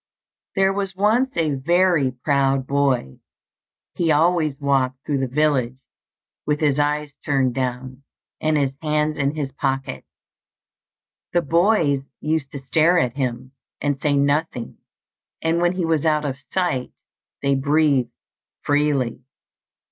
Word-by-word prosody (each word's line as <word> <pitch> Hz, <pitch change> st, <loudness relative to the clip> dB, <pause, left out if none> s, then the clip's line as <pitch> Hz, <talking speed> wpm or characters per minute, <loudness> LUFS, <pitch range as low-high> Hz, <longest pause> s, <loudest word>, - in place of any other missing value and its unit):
There 195 Hz, -1 st, +3 dB
was 195 Hz, -1 st, -3 dB
once 225 Hz, +6 st, +1 dB
a 160 Hz, -3 st, +1 dB
very 170 Hz, +1 st, +2 dB
proud 135 Hz, 0 st, 0 dB
boy. 135 Hz, -, 0 dB, 0.7 s
He 165 Hz, -2 st, +1 dB
always 155 Hz, -2 st, +2 dB
walked 135 Hz, -2 st, 0 dB
through 145 Hz, -2 st, 0 dB
the 130 Hz, -, 0 dB
village 130 Hz, -3 st, +1 dB, 0.7 s
with 150 Hz, 0 st, 0 dB
his 145 Hz, -2 st, +1 dB
eyes 145 Hz, 0 st, 0 dB
turned 135 Hz, -4 st, +1 dB
down 130 Hz, 0 st, -4 dB, 0.4 s
and 155 Hz, 0 st, +2 dB
his 135 Hz, -2 st, 0 dB
hands 150 Hz, -1 st, 0 dB
in 140 Hz, +1 st, 0 dB
his 145 Hz, -3 st, -3 dB
pockets. 135 Hz, -, -3 dB, 1.3 s
The 175 Hz, -1 st, +2 dB
boys 165 Hz, -3 st, +2 dB, 0.2 s
used 155 Hz, -3 st, -2 dB
to 135 Hz, -2 st, -8 dB
stare 165 Hz, +6 st, +3 dB
at 125 Hz, -7 st, +1 dB
him, 130 Hz, -1 st, -3 dB, 0.3 s
and 145 Hz, -2 st, -1 dB
say 145 Hz, -1 st, +2 dB
nothing; 140 Hz, -3 st, -1 dB, 0.6 s
and 165 Hz, +1 st, 0 dB
when 175 Hz, +1 st, +2 dB
he 180 Hz, -2 st, -1 dB
was 160 Hz, -3 st, +1 dB
out 155 Hz, -2 st, +1 dB
of 135 Hz, -2 st, -3 dB
sight, 175 Hz, -9 st, -1 dB, 0.5 s
they 140 Hz, 0 st, +2 dB
breathed 140 Hz, -1 st, +2 dB, 0.5 s
freely. 145 Hz, -5 st, +1 dB
145 Hz, 135 wpm, -22 LUFS, 135-160 Hz, 1.3 s, There